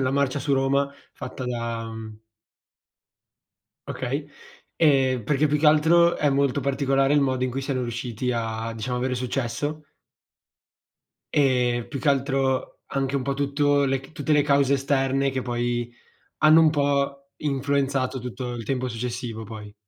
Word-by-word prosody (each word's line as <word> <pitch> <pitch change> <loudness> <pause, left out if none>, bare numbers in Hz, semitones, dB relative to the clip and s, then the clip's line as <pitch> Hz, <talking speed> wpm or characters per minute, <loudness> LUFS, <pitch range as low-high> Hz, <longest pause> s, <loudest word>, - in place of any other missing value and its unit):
la 130 -1 +1
marcia 140 0 +1
su 140 +1 -1
Roma 140 +1 +1 0.2
fatta 130 - -7
da 115 -2 -3
mhmm. 110 -1 -9 1.7
Okay, - - -3 0.5
e 135 -5 +3
perché 150 +3 +2
più 150 +1 +1
che 150 - +2
altro, 165 +3 +5
è 150 - +2
molto 140 0 +1
particolare 135 +1 +1
il 145 - +4
modo 130 -2 +1
in 130 - -1
cui 135 +2 -3
siano 135 -2 -2
riusciti 120 0 -3
a, 115 -1 -3
diciamo, 120 +3 -3
avere 130 +1 -1
successo. 135 +4 -3 1.5
E 125 -4 +2
più 140 - -5
che 145 - 0
altro 135 -1 0
anche 135 0 -2
un 140 - 0
po' 140 +1 -1
tutto 140 0 +2
le 135 -1 0
tutte 145 +2 -4
le 150 -1 +5
cause 140 -1 +3
esterne, 135 0 +1
che 130 -1 -3
poi 120 -1 -2 0.5
hanno 155 +1 +6
un 160 - +6
po' 140 -1 -1
influenzato 135 -2 -1
tutto 125 0 -5
il 120 -1 -5
tempo 130 +2 -2
successivo 120 -1 -4
poi. 105 -1 -9
135 Hz, 150 wpm, -24 LUFS, 125-140 Hz, 1.7 s, hanno